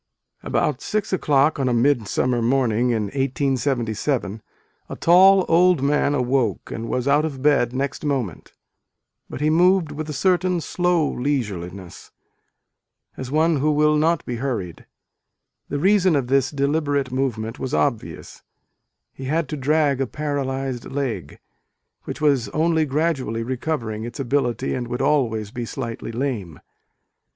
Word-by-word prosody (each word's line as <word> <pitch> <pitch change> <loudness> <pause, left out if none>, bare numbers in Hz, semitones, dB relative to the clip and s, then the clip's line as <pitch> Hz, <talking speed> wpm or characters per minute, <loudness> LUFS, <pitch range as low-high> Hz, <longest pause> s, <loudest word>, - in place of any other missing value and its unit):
not - - -8
be - - +2
hurried. - - +2
BOUT 150 -3 -2
six 210 -2 -2
o - - +3
clock 145 +1 +2
on 130 -2 +1
a 120 - +1
mid 120 -2 +2
summer 125 +4 0
morning 125 -1 +1
in 115 -3 0
1877, 130 -3 -1 0.5
a - - -5
tall 190 +2 +6
old 175 -3 +4
man 145 0 +2
awoke, 125 -5 0
and 115 0 -5
was 125 +1 -1
out 145 +2 +4
of 140 -4 -4
bed 140 -5 +3
next 135 +3 -3
moment, 130 - -3 0.8
but - - -7
he 155 +1 +2
moved 175 -1 +3
with 155 +1 -6
a - - -3
certain 180 +3 +1
slow 175 -1 +1
leisureliness, 100 -10 -4 1.1
as 130 - -6
one 160 +2 +2
who 145 +3 +1
will 150 0 +3
The 125 - -2 0.8
reason 185 +4 +3
of 135 -4 0
this 135 -1 +2
deliberate 145 -1 0
movement 120 -4 -2
was 130 - -2
obvious, 75 - -2 0.7
he 135 - -8
had 155 +4 0
to 150 - -3
drag 145 -1 +1
a 135 - 0
paralysed 135 -3 -3
leg, 120 - -4 0.7
which - - -6
was 140 -8 +2
only 160 +4 +1
gradually 135 -6 -1
re 130 +3 -3
covering 115 -6 -3
its 120 +5 -8
ability 135 -1 -1
and 125 -2 -3
would 125 +1 -3
always 110 -8 0
be 120 - -5
slightly 115 -2 -5
lame. 115 - -3
135 Hz, 145 wpm, -22 LUFS, 120-150 Hz, 1.1 s, tall